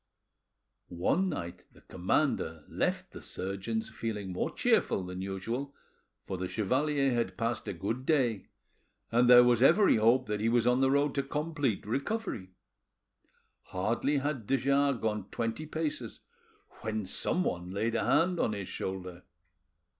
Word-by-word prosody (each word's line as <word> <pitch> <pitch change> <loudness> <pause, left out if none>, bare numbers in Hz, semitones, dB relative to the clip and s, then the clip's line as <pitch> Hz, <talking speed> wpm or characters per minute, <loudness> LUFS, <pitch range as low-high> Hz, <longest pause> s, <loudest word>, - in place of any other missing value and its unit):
One 130 - 0
night 85 - -6
the - - -20
commander 90 - -1
left - - -2
the - - -10
surgeon's 100 +4 -3
feeling 105 -4 -4
more - - -1
cheerful 95 - +1
than 90 +1 -6
usual, 115 +9 -4 0.5
for 95 - -4
the 95 - -2
chevalier 135 +7 +1
had 115 -6 -1
passed 115 -1 -2
a - - -2
good 105 +8 -3
day, 130 - +1 0.6
and 120 +1 +4
there 125 0 +10
was 120 -1 +3
every 170 - +6
hope 120 +4 +4
that 105 -2 -2
he 110 +2 +1
was 120 0 +2
on 125 +1 +3
the 135 - +4
road 140 +1 +2
to 140 - +1
complete 145 -5 -2
recovery. 140 - -3 1.2
Hardly 115 +10 0
had 140 -6 -2
de 135 - +3
Jars 140 +1 +2
gone 105 -3 -2
twenty 115 +6 -3
paces 150 -7 -3 0.6
when 110 -2 -3
someone 90 - 0
laid 110 +5 -1
a - - 0
hand 170 - +2
on 105 - +1
his 100 -3 -5
shoulder. 90 -2 -5
115 Hz, 145 wpm, -30 LUFS, 100-140 Hz, 1.2 s, there